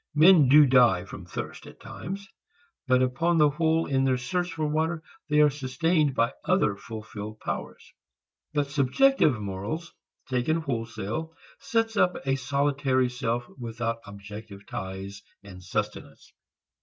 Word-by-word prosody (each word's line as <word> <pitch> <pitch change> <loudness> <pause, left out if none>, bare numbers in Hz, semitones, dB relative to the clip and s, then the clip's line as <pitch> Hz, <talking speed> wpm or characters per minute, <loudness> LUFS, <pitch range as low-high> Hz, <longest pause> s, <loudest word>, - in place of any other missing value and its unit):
Men 160 -2 +7
do 150 +2 +8
die 125 -9 +4
from 95 -2 -10
thirst - - -6
at - - -14
times, 195 +2 -7 0.6
but 130 0 +4
upon 165 +7 +1
the 150 -2 +5
whole 160 +2 +1
in 135 -1 +1
their 130 -1 +2
search 175 +8 -2
for 155 - -2
water 160 +2 -1 0.3
they 150 0 +4
are 150 -1 +5
sustained 150 +2 0
by 115 0 +2
other 180 - +2
fulfilled 110 0 -8
powers. - - -6 0.6
But 145 -2 -1
subjective 145 - +3
morals 105 - -5 0.3
taken 130 +6 0
wholesale 115 +3 -4 0.2
sets 225 -1 -1
up 180 -2 +3
a 135 0 +2
solitary 135 -1 +1
self 120 -1 -2
without 115 -1 -3
objective 100 0 -10
ties 95 +1 -6 0.2
and 90 -2 -12
sustenance. 90 - -5
130 Hz, 135 wpm, -27 LUFS, 110-160 Hz, 0.6 s, do